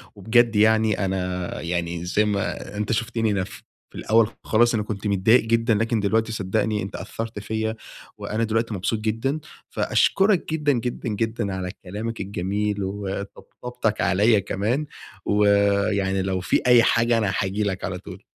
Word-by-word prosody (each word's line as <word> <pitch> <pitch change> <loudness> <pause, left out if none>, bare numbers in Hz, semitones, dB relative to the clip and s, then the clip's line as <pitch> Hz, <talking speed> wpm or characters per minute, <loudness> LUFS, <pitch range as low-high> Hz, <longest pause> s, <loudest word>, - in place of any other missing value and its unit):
وبجد 115 +3 +3
يعني 110 -1 +3
أنا 90 -1 -3
يعني 85 0 -3
زي 100 +4 +2
ما 105 0 -3
أنت 105 +1 -2
شفتني 115 0 0
أنا 100 -2 0
في - - -10 0.3
الأول 110 0 +3 0.2
خالص 120 +2 +3
أنا 105 - 0
كنت 105 0 -4
متضايق 100 +5 +4
جدًا، 115 0 +2
لكن 115 +1 +1
دلوقتي 110 +2 +1
صدقني 105 +1 -1
أنت 100 +2 -6
أثّرت 115 -1 -5
فيَّ، 110 +2 -2 0.4
وأنا 110 +2 -2
دلوقتي 115 0 0
مبسوط 100 +3 -1
جدًا. 115 +7 -1 0.3
فأشكرك 195 -5 +2
جدًا، 150 -2 +2
جدًا، 120 0 -3
جدًا، 110 -1 -2
على 90 -1 -4
كلامك 110 +5 -5
الجميل 100 +2 -2
وطبطبتك 100 +4 -4
عليَّ 100 +4 +3
كمان، 110 +10 -1 0.4
ويعني 100 -1 +2
لو 95 0 -1
في 90 - +1
أي 120 -2 +7
حاجة 115 0 +3
أنا 105 -4 0
هاجي 100 +2 -1
لك 95 -2 -2
على 90 - -3
طول. 95 0 -11
105 Hz, 150 wpm, -23 LUFS, 95-115 Hz, 0.4 s, أي